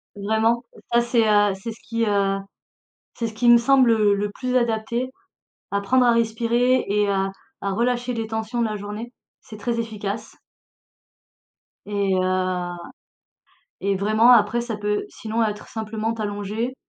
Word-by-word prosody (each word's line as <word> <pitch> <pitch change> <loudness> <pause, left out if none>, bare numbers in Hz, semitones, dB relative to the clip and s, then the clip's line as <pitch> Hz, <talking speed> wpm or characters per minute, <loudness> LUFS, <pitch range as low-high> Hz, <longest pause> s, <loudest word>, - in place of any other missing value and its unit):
Vraiment, 220 +3 +1 0.3
ça, 235 - +5
c'est, 235 -2 +2
heu, 205 -1 +4
c'est 230 - -4
ce 225 - -19
qui 230 0 -1
heu, 200 -1 +1 0.8
c'est 230 - -1
ce 220 - -8
qui 240 +2 +2
me 240 - +9
semble, 255 0 +4
heu, 210 -2 +4
le 205 +1 -1
plus 255 +3 -3
adapté. 235 +1 -1 0.6
Apprendre 245 +6 +3
à 240 - +5
respirer 235 +2 +2
et 205 0 +2
à 195 -1 0 0.3
à 200 - 0
relâcher 245 +3 0
les 225 -1 -2
tensions 220 +2 -3
de - - +2
la 215 -1 -2
journée. 210 +4 -7 0.3
C'est 215 - -11
très 235 +2 -1
efficace. 215 -1 -5 1.5
Et 200 -2 0
heu, 185 -1 0 1.1
et 200 0 0
vraiment 215 +5 +5
après 230 0 +4
ça 235 -2 -4
peut 210 0 -1
sinon 225 +1 -3
être 210 -1 -4
simplement 220 0 -3
t'allonger 215 +3 -3
220 Hz, 155 wpm, -23 LUFS, 205-235 Hz, 1.5 s, me